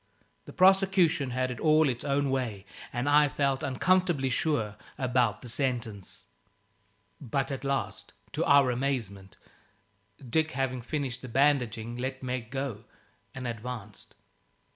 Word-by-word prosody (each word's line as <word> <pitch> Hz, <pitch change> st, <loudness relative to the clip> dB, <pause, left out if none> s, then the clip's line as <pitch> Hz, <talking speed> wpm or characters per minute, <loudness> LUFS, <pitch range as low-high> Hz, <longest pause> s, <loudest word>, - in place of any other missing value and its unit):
The -, -, -10 dB
prosecution 185 Hz, -6 st, +4 dB
had 130 Hz, +1 st, -1 dB
it 120 Hz, -, -6 dB
all 155 Hz, -1 st, +4 dB
its 120 Hz, -3 st, -2 dB
own 140 Hz, -1 st, +1 dB
way, 115 Hz, -7 st, -2 dB, 0.3 s
and 125 Hz, +1 st, -2 dB
I 145 Hz, 0 st, +6 dB
felt 135 Hz, -1 st, 0 dB
uncomfortably 170 Hz, -1 st, +1 dB
sure 115 Hz, -7 st, 0 dB, 0.2 s
about 125 Hz, -5 st, +1 dB
the 125 Hz, -, -9 dB
sentence. 115 Hz, -6 st, -3 dB, 0.9 s
But 135 Hz, +1 st, -2 dB
at 135 Hz, -1 st, -4 dB
last, 140 Hz, 0 st, -2 dB, 0.2 s
to 150 Hz, +3 st, -1 dB
our 140 Hz, -3 st, +5 dB
amazement, 115 Hz, -7 st, -3 dB, 0.9 s
Dick, 160 Hz, +6 st, +1 dB
having 130 Hz, -1 st, -1 dB
finished 130 Hz, -1 st, -3 dB
the 130 Hz, -, -8 dB
bandaging, 120 Hz, -4 st, +1 dB
let 130 Hz, +1 st, -4 dB
Meg 125 Hz, -3 st, -3 dB
go 135 Hz, -5 st, -4 dB, 0.5 s
and 130 Hz, -1 st, -6 dB
advanced. 115 Hz, -3 st, -7 dB
130 Hz, 130 wpm, -29 LUFS, 120-140 Hz, 0.9 s, I